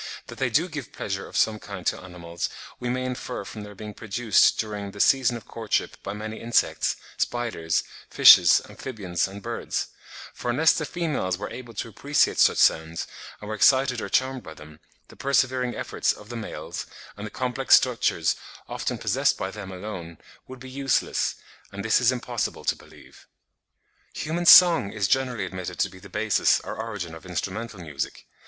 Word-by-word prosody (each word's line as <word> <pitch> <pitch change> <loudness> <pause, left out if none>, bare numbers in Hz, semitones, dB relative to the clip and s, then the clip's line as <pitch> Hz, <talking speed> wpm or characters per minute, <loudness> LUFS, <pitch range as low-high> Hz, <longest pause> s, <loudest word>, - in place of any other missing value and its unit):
That - - -9
they - - +1
do 165 +5 +2
give 145 -5 -7
pleasure 95 -1 -4
of - - -5
some 110 -1 +2
kind 100 -4 -8
to - - 0
animals, 85 -2 -5 0.3
we 125 - -3
may 130 +1 -1
infer 125 -3 -4
from 105 - -8
their 105 0 -10
being 105 +1 -8
produced 110 +1 +2
during 105 -2 -3
the 100 - -11
season 125 +1 +4
of 115 - -13
courtship 110 -2 -2
by - - -5
many 110 +1 -6
insects, 115 0 +1 0.2
spiders, 110 -10 -1 0.3
fishes, - - +8
amphibians, 95 -10 -3
and 100 +1 -10
birds; - - -3 0.4
for 120 - -5
unless 155 +7 +4
the 155 - -2
females 145 - -2
were 105 - -6
able 120 -1 -9
to 110 - -3
appreciate 140 +7 +1
such - - +5
sounds 80 +1 +2 0.3
and 105 - -9
were 110 - -3
excited 130 +2 +4
or - - -5
charmed 130 0 +1
by 80 -6 -11
them, 75 0 -14 0.3
the - - -14
persevering 130 -2 +1
efforts - - 0
of 105 - -14
the 120 - -6
males, 115 -2 -6 0.3
and 105 +1 -6
the - - -7
complex 130 +3 +3
structures 120 -10 +2 0.3
often - - -3
possessed - - +1
by 95 - -3
them 100 -2 -8
alone, 90 -4 -7 0.3
would 130 0 -10
be 130 - -10
useless; 135 0 0 0.4
and 100 +1 -6
this 110 - +4
it 125 - -1
is 120 - +6
impossible 125 -2 -3
to - - +2
believe. - - -17 0.9
Human 170 +3 -2
song 170 - +8
is 105 -3 0
generally 125 -6 0
admitted 90 -1 -6
to 100 - +1
be 95 - -13
the 100 - -13
basis 105 +3 +2
or - - -6
origin 105 -7 -5
of 80 -1 -10
instrumental 95 +4 -4
music. 75 -5 -5
110 Hz, 180 wpm, -25 LUFS, 95-125 Hz, 0.9 s, fishes